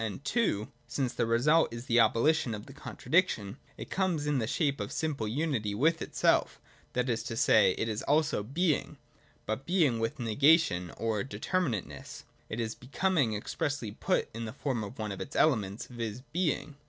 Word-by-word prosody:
And 110 Hz, +6 st, -5 dB
(2) 140 Hz, -, +1 dB, 0.2 s
since 125 Hz, +1 st, -2 dB
the 120 Hz, -, 0 dB
resuh 145 Hz, +8 st, +4 dB
is 115 Hz, +1 st, -7 dB
the 120 Hz, -2 st, +3 dB
abolition 115 Hz, +2 st, +3 dB
of 105 Hz, -, -9 dB
the 135 Hz, -, -12 dB
contradiction, 135 Hz, -, 0 dB, 0.2 s
it -, -, -8 dB
comes 180 Hz, -6 st, 0 dB
in 145 Hz, -2 st, +1 dB
the 110 Hz, -, -1 dB
shape 140 Hz, +1 st, 0 dB
of -, -, -3 dB
a -, -, -12 dB
simple 145 Hz, -9 st, -2 dB
unity 120 Hz, -5 st, -1 dB
with 160 Hz, +8 st, +2 dB
itself: -, -, +1 dB, 0.3 s
that 125 Hz, +1 st, 0 dB
is 115 Hz, -2 st, 0 dB
to 115 Hz, -, -4 dB
say, 100 Hz, -5 st, +5 dB
it 110 Hz, +1 st, -2 dB
also 150 Hz, -6 st, +2 dB
is 105 Hz, -, -13 dB
Being, 165 Hz, 0 st, 0 dB, 0.5 s
but 110 Hz, +6 st, -3 dB
Being 160 Hz, -10 st, +3 dB
with 115 Hz, 0 st, -2 dB
negation 120 Hz, -, +3 dB
or 110 Hz, -2 st, -1 dB
determinateness 135 Hz, -, -3 dB, 0.3 s
nit 110 Hz, -, -4 dB
is 115 Hz, -1 st, -2 dB
Becoming 135 Hz, -, 0 dB
expressly 140 Hz, +1 st, -3 dB
put -, -, 0 dB
in 115 Hz, +1 st, -5 dB
the 110 Hz, -, -6 dB
form 130 Hz, -5 st, -2 dB
of 100 Hz, -, -8 dB
one 105 Hz, -2 st, -3 dB
of 100 Hz, -, -6 dB
its 145 Hz, -, -7 dB
elements, 105 Hz, -9 st, +2 dB
viz. 115 Hz, -1 st, -5 dB
Being. 155 Hz, -4 st, -1 dB
125 Hz, 180 wpm, -30 LUFS, 110-150 Hz, 0.5 s, say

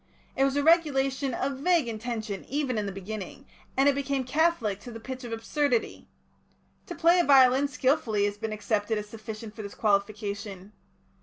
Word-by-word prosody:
It 270 Hz, -, +2 dB
was 275 Hz, 0 st, +2 dB
a 285 Hz, -, +1 dB
regulation 275 Hz, -5 st, +2 dB
of 270 Hz, -1 st, -2 dB
vague 335 Hz, -3 st, +2 dB
intention 220 Hz, -2 st, -4 dB
even 270 Hz, -5 st, -1 dB
in 205 Hz, -, -2 dB
the -, -, -3 dB
beginning, 195 Hz, +6 st, -7 dB, 0.3 s
and 270 Hz, +1 st, +4 dB
it 285 Hz, -, +5 dB
became 275 Hz, -1 st, -1 dB
catholic 260 Hz, -, +1 dB
to 240 Hz, -, -10 dB
the 225 Hz, -, -8 dB
pitch 260 Hz, +2 st, -7 dB
of 240 Hz, -, -7 dB
absurdity. 240 Hz, +2 st, -1 dB, 0.8 s
To 350 Hz, -, -6 dB
play 340 Hz, +2 st, +4 dB
a -, -, +4 dB
violin 270 Hz, -1 st, +6 dB
skilfully 255 Hz, -6 st, +1 dB
has 205 Hz, 0 st, -3 dB
been 220 Hz, 0 st, -3 dB
accepted 215 Hz, 0 st, -1 dB
as 210 Hz, 0 st, -5 dB
sufficient 215 Hz, 0 st, -8 dB
for 220 Hz, -, -6 dB
this 200 Hz, -1 st, -8 dB
qualification. 200 Hz, -1 st, -2 dB
240 Hz, 175 wpm, -27 LUFS, 210-275 Hz, 0.8 s, violin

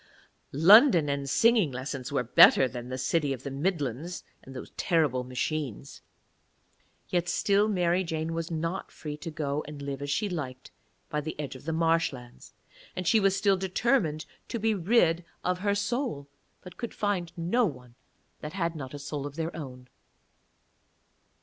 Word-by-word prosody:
London 175 Hz, -, +7 dB
and 140 Hz, -1 st, -2 dB
singing 225 Hz, -, +4 dB
lessons 130 Hz, 0 st, -5 dB
were -, -, 0 dB
better 130 Hz, +2 st, +7 dB
than 125 Hz, -1 st, -7 dB
the 130 Hz, -, -4 dB
City 140 Hz, +2 st, 0 dB
of 130 Hz, -1 st, -8 dB
the 140 Hz, -, -5 dB
Midlands 150 Hz, 0 st, -2 dB, 0.2 s
and 135 Hz, -, -12 dB
those 125 Hz, -, -8 dB
terrible 150 Hz, -8 st, +1 dB
machines. 130 Hz, 0 st, -4 dB, 1.1 s
Yet 175 Hz, -1 st, 0 dB
still 200 Hz, +1 st, +2 dB
Mary 180 Hz, -2 st, +1 dB
Jane 165 Hz, -1 st, -3 dB
was 165 Hz, 0 st, -3 dB
not 165 Hz, +2 st, -3 dB
free 150 Hz, -2 st, -7 dB
to 165 Hz, +3 st, -6 dB
go 150 Hz, -1 st, -2 dB
and 150 Hz, -1 st, -8 dB
live 140 Hz, -1 st, -5 dB
as 145 Hz, -, -4 dB
she 140 Hz, +10 st, 0 dB
liked 135 Hz, -8 st, -6 dB, 0.4 s
by 150 Hz, -, -1 dB
the 155 Hz, 0 st, -6 dB
edge 145 Hz, -3 st, -4 dB
of 130 Hz, -, -12 dB
the 160 Hz, -, -1 dB
marshlands, 160 Hz, -7 st, -1 dB, 0.4 s
and 180 Hz, -2 st, -4 dB
she 220 Hz, -, +5 dB
was 195 Hz, -1 st, +3 dB
still 195 Hz, -1 st, +2 dB
determined 185 Hz, -, 0 dB, 0.2 s
to -, -, -3 dB
be 220 Hz, 0 st, +1 dB
rid 175 Hz, -3 st, +2 dB, 0.2 s
of 180 Hz, 0 st, 0 dB
her 200 Hz, +1 st, +1 dB
soul, 205 Hz, -, -2 dB, 0.4 s
but 180 Hz, -, -12 dB
could 235 Hz, -, -6 dB
find 195 Hz, -5 st, -1 dB
no 205 Hz, +8 st, +2 dB
one 125 Hz, -6 st, -9 dB, 0.5 s
that 150 Hz, -, -7 dB
had 170 Hz, -3 st, -1 dB
not 135 Hz, -2 st, -7 dB
a -, -, -5 dB
soul 145 Hz, 0 st, -5 dB
of 145 Hz, -, -10 dB
their 165 Hz, +1 st, -3 dB
own. 130 Hz, -5 st, -8 dB
160 Hz, 170 wpm, -28 LUFS, 140-185 Hz, 1.1 s, London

